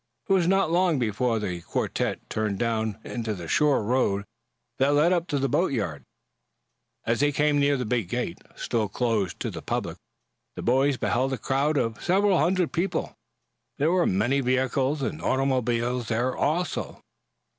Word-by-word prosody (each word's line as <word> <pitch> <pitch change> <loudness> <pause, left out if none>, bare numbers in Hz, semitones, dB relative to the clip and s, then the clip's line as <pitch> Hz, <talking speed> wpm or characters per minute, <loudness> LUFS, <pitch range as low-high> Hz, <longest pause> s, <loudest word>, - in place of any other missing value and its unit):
It 195 - +3
was 180 -3 +3
not 195 -3 +2
long 175 -2 +3
before 115 0 0
the 90 -5 -3
quartette - - -2
turned 105 -2 -2
down 110 -2 -1
into 115 -3 -4
the 85 -3 -8
shore 145 - +3
road 105 -4 +1 0.5
that 140 +2 +3
led 160 +5 +4
up 175 -1 0
to 145 - -1
the 135 0 +1
boatyard. 110 - 0 1.0
As 115 0 +1
they 145 +1 +3
came 145 0 +2
near 140 0 +3
the 125 - -3
big 115 -5 -1
gate, 120 -7 -3 0.2
still 110 -3 -1
closed 110 -5 -1
to - - -2
the - - -7
public, - - -3 0.6
the - - -6
boys 135 +3 +2
beheld 125 +6 0
a - - -1
crowd 140 +4 0
of 115 -4 -1
several 195 0 +3
Hundred 175 +2 +1
people. 175 0 -2 0.6
There 155 +4 +2
were 180 -1 +3
many 115 +9 +1
vehicles 130 +3 0
and 155 +4 -3
automobiles 125 -2 0
there, 120 +3 0
also. 170 +5 -1
130 Hz, 165 wpm, -26 LUFS, 115-150 Hz, 1.0 s, led